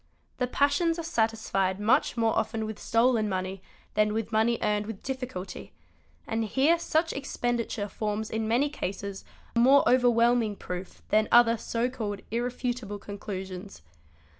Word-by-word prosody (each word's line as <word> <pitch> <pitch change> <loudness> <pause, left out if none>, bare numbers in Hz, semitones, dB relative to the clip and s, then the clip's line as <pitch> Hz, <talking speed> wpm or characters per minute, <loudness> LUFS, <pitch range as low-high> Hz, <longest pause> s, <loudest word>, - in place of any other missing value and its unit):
The 250 - +1
passions 290 +6 +2
are 335 - -4
satisfied 220 - 0
much 220 +3 +2
more 225 -1 +2
often 220 -1 -1
with 215 -1 -6
stolen 230 -2 +2
money 185 0 -3 0.3
than 210 0 +2
with 225 0 -2
money 225 +2 +2
earned 210 0 0
with 220 -3 -7
difficulty, 255 -8 -6 0.5
and 225 0 -1
here 275 +10 +3
such 325 0 0
expenditure 240 -5 -2
forms 210 +1 -3
in 220 0 -1
many 245 +6 +3
cases 200 -6 -5 0.3
more 265 +4 +6
overwhelming 240 -3 +4
proof 180 -1 -7
than 215 0 +3
other 235 -1 +6
so 230 +1 -1
called 215 -6 -4
irrefutable 240 -2 -2
conclusions. 195 - -7
225 Hz, 140 wpm, -28 LUFS, 205-245 Hz, 0.5 s, more